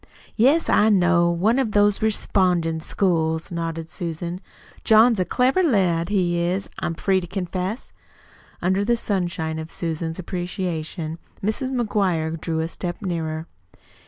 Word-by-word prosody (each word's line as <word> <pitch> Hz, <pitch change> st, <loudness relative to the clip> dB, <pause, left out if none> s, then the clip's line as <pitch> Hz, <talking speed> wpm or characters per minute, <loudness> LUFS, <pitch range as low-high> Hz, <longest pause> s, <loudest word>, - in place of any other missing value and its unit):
"Yes, 275 Hz, +9 st, +4 dB
I 215 Hz, -, +4 dB
know 175 Hz, -3 st, +4 dB
one 200 Hz, +9 st, +2 dB
of 225 Hz, -6 st, 0 dB
them 205 Hz, 0 st, +5 dB
respondin' 180 Hz, -6 st, +1 dB
schools," 160 Hz, -3 st, 0 dB
nodded 165 Hz, -1 st, -3 dB
Susan. 170 Hz, +1 st, -5 dB, 0.4 s
"John's 220 Hz, 0 st, +5 dB
a 185 Hz, -, +2 dB
clever 255 Hz, -, +2 dB
lad, 185 Hz, -, +2 dB
he 180 Hz, -4 st, +1 dB
is, 180 Hz, +3 st, -1 dB
I'm 165 Hz, -, -2 dB
free 190 Hz, +3 st, +1 dB
to 175 Hz, -, -7 dB
confess." 185 Hz, +4 st, -4 dB, 0.7 s
Under 190 Hz, +3 st, +2 dB
the 235 Hz, +3 st, +2 dB
sunshine 175 Hz, -7 st, -2 dB
of 160 Hz, 0 st, -6 dB
Susan's 165 Hz, -1 st, -3 dB
appreciation 175 Hz, -3 st, -4 dB, 0.2 s
Mrs. 220 Hz, +6 st, -1 dB
McGuire 190 Hz, -10 st, 0 dB
drew 160 Hz, -1 st, -1 dB
a 160 Hz, -, -1 dB
step 175 Hz, +3 st, -5 dB
nearer. 160 Hz, -3 st, -3 dB
180 Hz, 135 wpm, -23 LUFS, 165-205 Hz, 0.7 s, them